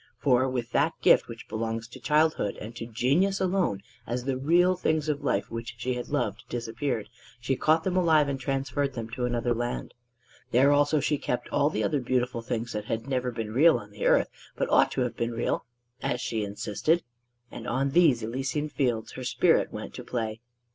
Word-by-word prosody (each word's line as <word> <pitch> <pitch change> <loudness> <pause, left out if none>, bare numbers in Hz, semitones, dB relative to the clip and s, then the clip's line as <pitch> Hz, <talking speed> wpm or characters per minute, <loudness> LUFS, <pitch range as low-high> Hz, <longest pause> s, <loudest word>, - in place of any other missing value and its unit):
For 130 -1 +3
with 125 -2 -3
that 155 +4 +1
gift - - +5
which 115 -1 -9
belongs 115 +1 -3
to 130 - -11
childhood 150 -3 +1
and 110 +2 -8
to 115 0 -6
genius 140 - +1
alone, 180 - 0 0.2
as 120 +1 -2
the 135 0 -1
real 175 +7 +3
things 155 -3 0
of 150 -1 -1
life - - 0
which 115 +1 -5
she 125 +2 -2
had 125 0 -5
loved - - -1
disappeared, 115 -1 -3 0.3
she 125 +2 0
caught 160 +5 +3
them 185 -1 -1
alive 160 -5 +4
and 135 -1 -2
transferred 135 +1 -1
them 115 -2 -6
to 125 +1 -2
another 120 0 0
land. 120 +1 -3 0.6
There 135 +4 +5
also 145 +1 +3
she 150 0 0
kept 125 - -3
all 145 - +2
the 110 -8 -2
other 140 +8 +1
beautiful 125 -1 -1
things 115 0 -3
that 105 -1 -3
had 115 +3 -3
never 130 -2 0
been 115 -3 -5
real 155 +4 +6
on 105 -3 -10
the 105 - -2
earth - - +3 0.2
but - - -2
ought - - +5
to - - -1
have 120 -2 -1
been 120 0 -2
real, 115 - -1 0.4
as 120 - -1
she 110 -3 -2
insisted; 105 - 0 0.5
and 120 - -8
on 135 +3 0
these 150 -8 +4
Elysian 135 +6 -2
Fields 120 -7 -1
her 130 - -7
spirit 125 - +2
went - - -7
to - - -7
play. 115 -2 -3
125 Hz, 200 wpm, -27 LUFS, 115-145 Hz, 0.6 s, real